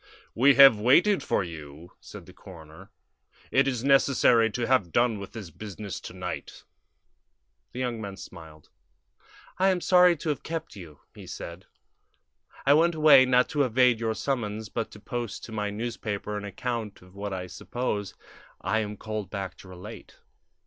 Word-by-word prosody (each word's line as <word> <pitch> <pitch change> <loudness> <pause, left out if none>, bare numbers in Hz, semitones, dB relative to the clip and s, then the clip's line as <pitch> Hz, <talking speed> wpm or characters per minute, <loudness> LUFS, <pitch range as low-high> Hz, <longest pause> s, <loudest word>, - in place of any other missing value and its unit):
"We 135 +4 +5
have 135 -6 +8
waited 170 - +4
for - - 0
you," 80 -1 -10
said - - -12
the - - -15
coroner. 80 -4 -14 0.6
"It 135 +1 +3
is 125 -3 -2
necessary 135 -4 +4
to 120 +2 -3
have 115 -9 +1
done 120 -1 +2
with 100 -1 -9
this 100 -7 -8
business 100 +1 -7
to - - -10
night." 90 -6 -7 1.1
The 125 - -5
young 120 -3 -3
man 100 -2 -7
smiled. 80 -5 -13 0.9
"I 190 - +4
am 185 -1 +1
sorry 180 -1 +5
to 155 - -4
have 145 - -2
kept 165 -8 -6
you," 80 -7 -12
he - - -12
said. 85 +3 -8 1.0
"I 140 - +6
went 165 +3 +3
away, 150 -4 +7
not 125 0 +4
to 145 - 0
evade 125 -2 +3
your 110 -1 -1
summons, 110 -4 -3
but 115 -2 -3
to 105 - -13
post 120 0 -5
to - - -9
my 105 -1 -2
newspaper 105 -1 -4
an 105 0 -5
account 110 0 -5
of 90 0 -19
what 100 +1 -6
I 90 -1 -4
suppose 105 +1 -4 0.4
I 110 - 0
am 105 -1 -4
called 110 -3 -5
back 95 -2 -5
to - - -14
relate." 90 -1 -11
110 Hz, 170 wpm, -27 LUFS, 95-130 Hz, 1.1 s, have